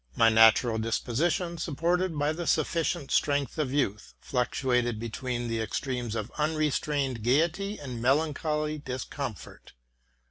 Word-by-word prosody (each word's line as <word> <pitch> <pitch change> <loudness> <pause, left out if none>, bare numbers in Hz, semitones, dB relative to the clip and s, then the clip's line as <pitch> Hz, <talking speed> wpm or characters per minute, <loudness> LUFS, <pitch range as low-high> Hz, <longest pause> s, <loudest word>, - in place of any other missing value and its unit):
My 115 -1 +5
natural 110 +1 +5
disposition, 155 +10 -1
supported 170 +3 0
by 145 +1 +1
the 170 +1 -5
sufficient 165 -1 0
strength 145 0 +1
of 140 -4 0
youth, 110 -7 -1
fluctuated 125 -2 0
between 120 +1 -3
the 115 -1 -1
ex 110 - -2
tremes 125 -4 -3
of 110 -2 -4
unrestrained 150 -4 0
gayety 165 - +1
and 125 -5 -6
melancholy 150 +3 0
discomfort. 130 - -6
140 Hz, 120 wpm, -28 LUFS, 120-155 Hz, -, My